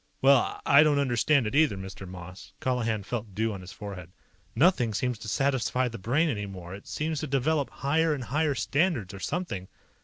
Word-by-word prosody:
"Well, 135 -1 +4
I 140 +1 +7
don't 150 -2 +4
understand 135 0 +2
it 105 - -3
either, 145 -8 +3
Mr. 95 0 -8
Moss." 90 +1 -10
Colihan 115 -5 -1
felt 105 -2 -5
dew 110 +1 0
on 95 - -7
his 90 0 -10
forehead. 95 -5 -8 0.5
"Nothing 135 - +3
seems 125 -1 -1
to 110 - -8
satisfy 130 +1 +1
the 115 -1 -8
Brain 135 - +2
anymore. 100 - -5
It 100 - -10
seems 155 0 -2
to 155 - -3
develop 140 0 +1
higher 155 +6 +1
and 135 - -5
higher 145 +4 0
standards, 140 - 0
or 100 - -8
something. 100 - -3
125 Hz, 185 wpm, -28 LUFS, 100-145 Hz, 0.5 s, I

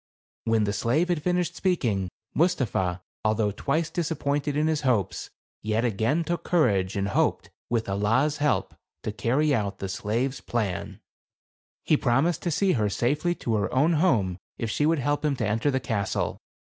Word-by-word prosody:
When 115 -1 +2
the 100 -1 0
slave 145 +12 +1
had 170 -4 +1
finished 180 +1 0
speaking, 115 - 0 0.2
Mus 180 +3 +3
tapha, 95 -7 -1 0.2
although 110 -1 +1
twice 150 +10 -1
disappointed 145 -4 -1
in 150 - +2
his 155 -1 +1
hopes, 120 - 0 0.3
yet 110 +2 0
again 120 +9 +1
took 170 +2 -2
courage 100 - +2
and 100 0 0
hoped, - - 0 0.2
with 115 -2 0
Allah's 115 +10 +1
help, 145 -1 0 0.3
to 110 - -2
carry 140 +8 +1
out 100 -5 -1
the 95 - -4
slave's 115 +8 -2
plan. 105 -7 -3 0.8
He 155 - +3
promised 140 +7 +1
to 175 - -1
see 190 +4 +2
her 110 - +1
safely 150 - 0
to 115 - -2
her 105 0 -1
own 150 +6 +3
home 115 - +2 0.2
if 115 -2 -2
she 150 - +1
would 165 +1 +3
help 145 +2 0
him 150 -2 +1
to 115 -5 -1
enter 110 +7 +1
the 130 -1 +1
castle. 110 -5 -2
130 Hz, 170 wpm, -26 LUFS, 105-155 Hz, 0.8 s, Mus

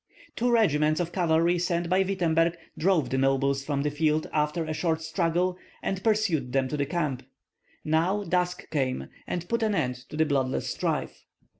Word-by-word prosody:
Two 245 +2 +1
regiments 155 -10 +3
of 175 -1 -2
cavalry 170 -1 +2
sent 175 0 0
by 185 +2 +3
Wittemberg 170 -3 +1 0.2
drove 165 -6 +1
the 130 - +1
nobles 135 0 +2
from 140 -1 -1
the 150 - 0
field 155 +1 +1
after 150 +2 0
a 155 0 -3
short 160 0 -1
struggle, 175 +3 0 0.2
and 190 -1 -2
pursued 185 - +1
them 135 -1 +2
to 150 - -2
the 140 -1 0
camp. 150 -6 -1 0.6
Now 170 +7 +1
dusk 180 0 -1
came, 130 - -1 0.2
and 175 -1 -3
put 235 +3 0
an 215 -2 +1
end 125 -7 0
to 150 - -7
the 160 - +4
bloodless 135 -3 0
strife. - - -3
160 Hz, 175 wpm, -27 LUFS, 145-180 Hz, 0.6 s, the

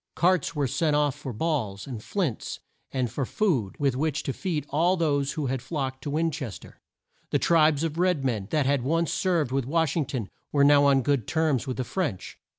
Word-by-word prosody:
Carts 175 -2 +2
were 145 -1 +1
sent 145 +4 +1
off 145 -2 +2
for 130 - -7
balls, 110 -7 -2
and 120 -6 -6
flints, 170 - -3 0.3
and 125 -4 -1
for 140 - -2
food 130 - 0
with 140 -3 +1
which 150 +2 -1
to 135 - -2
feed 165 -5 -2
all 175 +5 +3
those 145 -4 +1
who 155 -3 -2
had 130 -1 -2
flocked 130 -2 -4
to 145 - -4
Win 160 +3 +1
ches 135 -9 -5
ter. - - -16 0.5
The - - +2
tribes 155 -2 +3
of 165 0 -2
red 180 -6 +2
men 110 -7 -1
that 150 -3 +1
had 140 -1 +2
once 165 +5 0
served 170 -8 +1
with 135 -1 0
Wash 160 +2 +1
ing 155 -6 0
ton, 120 -9 -4 0.2
were 140 -1 +3
now 145 0 +6
on 135 -2 +4
good 140 -5 +1
terms 155 -5 +1
with 130 - -3
the 130 - -1
French. 150 - -3
145 Hz, 215 wpm, -26 LUFS, 130-160 Hz, 0.5 s, now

